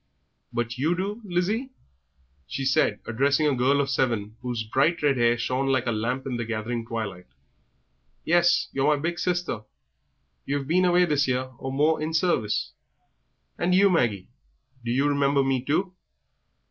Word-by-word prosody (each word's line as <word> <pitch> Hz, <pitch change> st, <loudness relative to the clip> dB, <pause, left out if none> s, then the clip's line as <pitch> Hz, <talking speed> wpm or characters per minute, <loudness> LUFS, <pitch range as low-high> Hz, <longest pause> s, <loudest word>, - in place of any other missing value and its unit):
"But 120 Hz, +1 st, -3 dB
you 160 Hz, +6 st, +1 dB
do, 200 Hz, +5 st, -3 dB
Lizzie?" 205 Hz, +7 st, -1 dB, 0.8 s
she 135 Hz, -, -4 dB
said, 115 Hz, -5 st, +2 dB
addressing 140 Hz, +6 st, +1 dB
a 145 Hz, -, +3 dB
girl 130 Hz, +3 st, +2 dB
of 140 Hz, -, +1 dB
seven, 115 Hz, -6 st, -1 dB
whose 120 Hz, -2 st, -3 dB
bright 140 Hz, +9 st, +1 dB
red 145 Hz, -2 st, +3 dB
hair 120 Hz, 0 st, +3 dB
shone 130 Hz, +3 st, -1 dB
like 130 Hz, -2 st, +1 dB
a 120 Hz, -, 0 dB
lamp 120 Hz, +4 st, -2 dB
in 130 Hz, -3 st, -3 dB
the 120 Hz, -, -2 dB
gathering 115 Hz, +1 st, -4 dB
twilight. 105 Hz, -6 st, -5 dB, 1.0 s
"Yes, 175 Hz, +1 st, +3 dB
you're 140 Hz, +2 st, +2 dB
my -, -, -6 dB
big 170 Hz, +3 st, -2 dB
sister; 180 Hz, -9 st, -1 dB, 0.8 s
you've 140 Hz, 0 st, -2 dB
been 180 Hz, +4 st, +3 dB
away 180 Hz, 0 st, +4 dB
this 145 Hz, -4 st, +1 dB
year 130 Hz, 0 st, -1 dB
or 135 Hz, -, -4 dB
more 150 Hz, +4 st, +2 dB
in 160 Hz, +1 st, -2 dB
service." 155 Hz, -, 0 dB, 0.9 s
"And 180 Hz, +1 st, +2 dB
you, 195 Hz, +1 st, +5 dB
Maggie, 115 Hz, -, 0 dB, 0.5 s
do 120 Hz, -, -4 dB
you 135 Hz, +4 st, +2 dB
remember 140 Hz, -1 st, +2 dB
me 135 Hz, -2 st, 0 dB
too?" 180 Hz, +7 st, 0 dB
135 Hz, 160 wpm, -25 LUFS, 120-165 Hz, 1.0 s, you